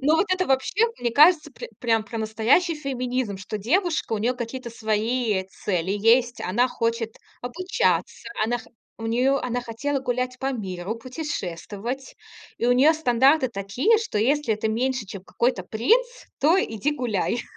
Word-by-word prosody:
ну, 300 Hz, +4 st, +3 dB
вот 405 Hz, -, +2 dB
это 370 Hz, 0 st, +1 dB
вообще, 275 Hz, -, +2 dB
мне 240 Hz, -1 st, -1 dB
кажется, 305 Hz, +3 st, +5 dB
пр -, -, -8 dB
прям 225 Hz, -2 st, +2 dB
про 230 Hz, -1 st, -6 dB
настоящий 225 Hz, +11 st, +2 dB
феминизм, 255 Hz, -6 st, -3 dB
что 205 Hz, +2 st, -5 dB
девушка, 320 Hz, -, 0 dB
у 215 Hz, -, +1 dB
нее 240 Hz, +4 st, 0 dB
какие-то 245 Hz, 0 st, -6 dB
свои, 220 Hz, +1 st, 0 dB
э, 190 Hz, 0 st, -1 dB, 0.2 s
цели 185 Hz, -1 st, 0 dB
есть. 235 Hz, +4 st, +3 dB
Она 240 Hz, +8 st, +1 dB
хочет 230 Hz, -1 st, -2 dB, 0.2 s
обучаться. 365 Hz, -, -1 dB, 0.2 s
Она 240 Hz, +2 st, 0 dB
хо -, -, -14 dB, 0.3 s
у 225 Hz, -, -5 dB
нее 255 Hz, +4 st, +2 dB
она 245 Hz, 0 st, -2 dB
хотела 270 Hz, +5 st, -2 dB
гулять 250 Hz, 0 st, -2 dB
по 270 Hz, 0 st, -1 dB
миру, 190 Hz, -2 st, -4 dB
путешествовать. 245 Hz, -, -5 dB, 0.4 s
И 235 Hz, -, 0 dB
у 245 Hz, -, +5 dB
нее 275 Hz, +6 st, +5 dB
стандарты 265 Hz, -1 st, +3 dB
такие, 240 Hz, -, +1 dB
что 445 Hz, -, -4 dB
если 265 Hz, 0 st, +2 dB
ты 215 Hz, +1 st, -2 dB
меньше, 250 Hz, 0 st, -1 dB
чем 190 Hz, 0 st, -9 dB
какой-то 235 Hz, -7 st, -1 dB
принц, 440 Hz, -, +2 dB, 0.3 s
то 335 Hz, +7 st, +4 dB
иди 275 Hz, +7 st, -1 dB
гуляй. 235 Hz, -2 st, -1 dB
245 Hz, 165 wpm, -24 LUFS, 220-275 Hz, 0.4 s, кажется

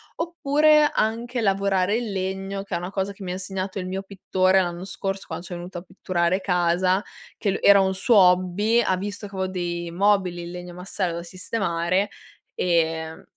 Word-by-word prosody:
Oppure 305 Hz, -2 st, +3 dB
anche 235 Hz, +3 st, -1 dB
lavorare 195 Hz, -1 st, +2 dB
il 235 Hz, -3 st, -3 dB
legno, 195 Hz, +1 st, -3 dB
che 200 Hz, -, -9 dB
è -, -, +1 dB
una 175 Hz, +1 st, -5 dB
cosa 195 Hz, 0 st, -2 dB
che 200 Hz, -, -17 dB
mi 180 Hz, -, -4 dB
ha -, -, -2 dB
insegnato 190 Hz, +1 st, -4 dB
il 185 Hz, -, -4 dB
mio 190 Hz, +1 st, -3 dB
pittore, 190 Hz, -1 st, +2 dB
l'anno 175 Hz, 0 st, -4 dB
scorso, 195 Hz, 0 st, -4 dB
quando 175 Hz, -, -6 dB
c'è 175 Hz, -, -6 dB
venuto 175 Hz, +1 st, -7 dB
a -, -, -11 dB
pitturare 185 Hz, -1 st, -1 dB
casa, 180 Hz, +1 st, +2 dB, 0.3 s
che 200 Hz, -, 0 dB
l -, -, -2 dB
era 200 Hz, -1 st, +7 dB
un 190 Hz, 0 st, +1 dB
suo 225 Hz, +6 st, +2 dB
hobby 185 Hz, +4 st, +4 dB
ha 190 Hz, -5 st, +1 dB
visto 205 Hz, +2 st, -5 dB
che 200 Hz, -, -12 dB
avevo 190 Hz, 0 st, -1 dB
dei 175 Hz, -2 st, -3 dB
mobili 185 Hz, -1 st, +1 dB
in 170 Hz, -, -7 dB
legno 180 Hz, 0 st, -8 dB
massello 180 Hz, -1 st, -3 dB
da 170 Hz, -, -5 dB
sistemare, 185 Hz, 0 st, -1 dB, 0.5 s
ehm, 160 Hz, -2 st, 0 dB
190 Hz, 190 wpm, -24 LUFS, 180-200 Hz, 0.5 s, era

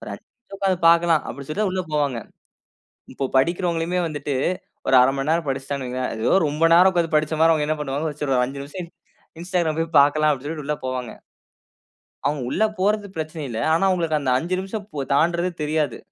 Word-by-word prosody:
ஒரு -, -, -8 dB
5 -, -, -10 dB
நிமிஷம் 240 Hz, -5 st, -13 dB
உட்கார்ந்து 190 Hz, -3 st, +1 dB
பார்க்கலாம், 170 Hz, -1 st, +4 dB
அப்படின்னு 140 Hz, -1 st, -8 dB
சொல்லிட்டு 190 Hz, +8 st, -1 dB
தான் 195 Hz, -, 0 dB
உள்ள 185 Hz, 0 st, -1 dB
போவாங்க. 145 Hz, -5 st, 0 dB, 1.0 s
இப்ப 135 Hz, 0 st, -3 dB
படிக்கிறவங்களுமே 170 Hz, +3 st, 0 dB
வந்துட்டு 145 Hz, -3 st, -4 dB, 0.5 s
ஒரு -, -, +4 dB
1/2 130 Hz, +2 st, +4 dB
மணி 135 Hz, +2 st, -2 dB
நேரம் 165 Hz, -1 st, +1 dB
படிச்சுட்டாங்கன்னு 135 Hz, 0 st, -3 dB
வையுங்களேன். 130 Hz, 0 st, -2 dB, 0.2 s
ஏதோ -, -, +4 dB
ரொம்ப 150 Hz, +2 st, -2 dB
நேரம் 180 Hz, +2 st, +7 dB
உட்கார்ந்து 170 Hz, -3 st, 0 dB
படிச்ச 155 Hz, +1 st, +1 dB
மாரி, 165 Hz, 0 st, +6 dB
அவங்க 150 Hz, -1 st, 0 dB
என்ன 155 Hz, 0 st, 0 dB
பண்ணுவாங்கனா, 145 Hz, +2 st, -2 dB, 0.2 s
ஒரு 125 Hz, -1 st, +3 dB
5 135 Hz, +3 st, -4 dB
நிமிஷம் 170 Hz, +4 st, -8 dB, 0.5 s
Instagram 175 Hz, -3 st, 0 dB
போய் 165 Hz, 0 st, -3 dB
பார்க்கலாம் 150 Hz, +2 st, +3 dB
அப்படி 140 Hz, -1 st, -4 dB
சொல்லிட்டு 150 Hz, -1 st, -5 dB
உள்ள 150 Hz, -, 0 dB
போவாங்க 130 Hz, -2 st, -3 dB, 1.1 s
அவங்க 145 Hz, 0 st, 0 dB
உள்ள 215 Hz, -, +1 dB, 0.2 s
போறது 205 Hz, +2 st, +1 dB
பிரச்சன 155 Hz, 0 st, -5 dB
இல்ல. 115 Hz, -2 st, -4 dB
ஆனா 165 Hz, -, +2 dB
அவங்களுக்கு 165 Hz, -4 st, +1 dB
அந்த 130 Hz, -2 st, 0 dB
5 175 Hz, +7 st, -2 dB
நிமிஷம் 200 Hz, +1 st, -6 dB
போ 145 Hz, -, -3 dB
தாண்டுறது 170 Hz, +4 st, +2 dB
தெரியாது! 150 Hz, -4 st, -1 dB
155 Hz, 190 wpm, -22 LUFS, 140-175 Hz, 1.1 s, நேரம்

